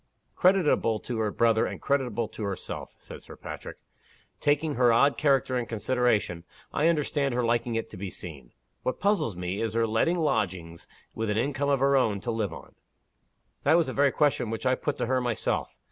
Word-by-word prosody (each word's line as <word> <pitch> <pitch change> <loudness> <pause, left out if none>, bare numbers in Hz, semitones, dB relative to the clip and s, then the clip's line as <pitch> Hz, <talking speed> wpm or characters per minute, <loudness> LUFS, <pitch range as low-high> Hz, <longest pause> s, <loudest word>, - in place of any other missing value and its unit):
"Creditable 180 - +3
to 120 -3 -4
her 110 -1 +1
brother, 115 +1 +2
and - - -6
creditable 125 -5 0
to - - -10
herself," 100 -3 -5
said - - -11
Sir - - -12
Patrick. - - -8 0.6
"Taking 145 +1 +1
her 125 -1 +4
odd 140 +5 +4
character 140 -3 +2
into 120 - -5
consideration, 115 -6 0 0.3
I 150 - +2
understand 145 -4 +1
her 125 - +1
liking 120 0 0
it 115 0 -3
to - - -9
be 95 +1 -5
seen. 70 -10 -8 0.3
What 130 - -2
puzzles 200 - +1
me, 90 +3 -3
is 110 -1 -2
her 115 0 +3
letting 115 +11 +1
lodgings 90 - -2 0.3
with 110 -1 -3
an 105 - 0
income 140 +4 0
of 140 -2 +2
her 140 0 +4
own 110 -7 +2
to 120 - -2
live 110 -5 -1
on." 80 - -11 0.9
"That - - +4
was 170 - +3
the 130 - -4
very 140 -1 +3
question 145 -6 +1
which 115 +3 -4
I 130 - +4
put 140 +2 -2
to - - -1
her 130 +1 +1
myself. 120 -3 -1
120 Hz, 195 wpm, -27 LUFS, 110-140 Hz, 0.9 s, her